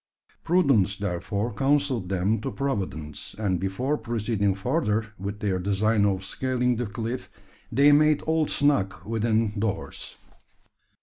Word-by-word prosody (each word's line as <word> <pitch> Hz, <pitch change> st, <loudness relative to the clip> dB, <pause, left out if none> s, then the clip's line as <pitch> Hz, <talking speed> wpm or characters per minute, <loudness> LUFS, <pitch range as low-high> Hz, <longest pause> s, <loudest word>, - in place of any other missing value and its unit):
Prudence 135 Hz, -, +3 dB
therefore 100 Hz, +3 st, -2 dB
counselled 135 Hz, -4 st, +1 dB
them 100 Hz, +3 st, +1 dB
to -, -, -3 dB
providence; 95 Hz, -, -4 dB
and 95 Hz, -5 st, 0 dB
before 125 Hz, -, -1 dB
proceeding 110 Hz, -4 st, 0 dB
farther 110 Hz, -2 st, -1 dB
with 100 Hz, +2 st, -5 dB
their 95 Hz, -3 st, 0 dB
design 100 Hz, +3 st, +2 dB
of 95 Hz, -1 st, -1 dB
scaling 125 Hz, +2 st, 0 dB
the 120 Hz, -1 st, -2 dB
cliff, 115 Hz, +3 st, -4 dB, 0.4 s
they 140 Hz, +2 st, +5 dB
made 150 Hz, 0 st, +4 dB
all 160 Hz, -1 st, +1 dB
snug 140 Hz, -10 st, +1 dB
within 110 Hz, -1 st, 0 dB
doors. 105 Hz, -1 st, -4 dB
110 Hz, 125 wpm, -26 LUFS, 100-130 Hz, 0.4 s, they